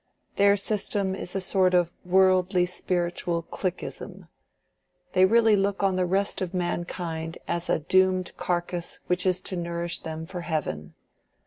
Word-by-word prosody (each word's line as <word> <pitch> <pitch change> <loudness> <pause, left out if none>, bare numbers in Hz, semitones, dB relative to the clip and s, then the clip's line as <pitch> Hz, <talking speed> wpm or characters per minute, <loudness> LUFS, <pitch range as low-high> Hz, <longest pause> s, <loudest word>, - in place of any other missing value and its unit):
Their 200 0 +5
system 200 -1 -1
is 185 -1 -5
a - - +1
sort 185 -1 +2
of 175 -1 +3
worldly 185 0 +3
spiritual 175 -1 -2
cliqueism: 185 +2 -5 0.8
they 185 0 +6
really 225 +1 +5
look 200 0 0
on 195 -1 +2
the 185 -1 +1
rest 195 +3 0
of 185 0 -3
mankind 170 -2 -3
as 170 +1 -2
a - - +3
doomed 185 +3 +2
carcass 175 0 -2
which 180 +1 0
is 185 0 +1
to 185 - -3
nourish 170 0 -2
them 160 0 -6
for 180 +1 -6
heaven. 140 - -3
180 Hz, 145 wpm, -26 LUFS, 175-190 Hz, 0.8 s, they